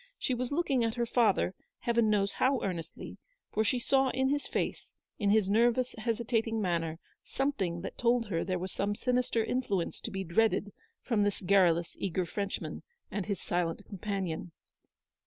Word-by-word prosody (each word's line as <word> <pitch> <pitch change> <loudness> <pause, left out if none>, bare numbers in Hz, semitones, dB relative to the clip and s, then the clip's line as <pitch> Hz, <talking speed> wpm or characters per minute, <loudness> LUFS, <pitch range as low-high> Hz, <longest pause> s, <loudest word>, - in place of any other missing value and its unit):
She 260 - -1
was 250 +1 -2
looking 285 -5 +2
at 225 -1 0
her 240 -1 0
father, 225 -6 +2 0.3
Heaven 235 -2 +2
knows 200 -2 +2
how 260 0 +2
earnestly, 175 -4 -5 0.3
for 220 - +2
she 220 +4 +1
saw 265 +2 +3
in 265 +1 +1
his 290 +1 0
face, - - -2 0.3
in 205 -3 +2
his 210 -1 +4
nervous 240 +4 +3
hesitating 225 0 0
manner, 165 -5 0 0.3
something 195 -12 -1
that - - -7
told 240 -1 +3
her 165 -4 0
there 185 0 -1
was 185 +1 -4
some 205 +1 -1
sinister 245 -2 +1
influence 205 -9 -1
to - - -5
be 195 -2 -3
dreaded 205 +3 +1 0.3
from 230 -4 +1
this 205 -1 +1
garrulous, 175 -3 +3
eager 185 -1 -1
Frenchman 200 +4 -4 0.3
and 205 -2 -3
his 200 -4 -1
silent 175 +2 -1
companion. 190 -4 -3
210 Hz, 165 wpm, -31 LUFS, 185-240 Hz, 0.3 s, his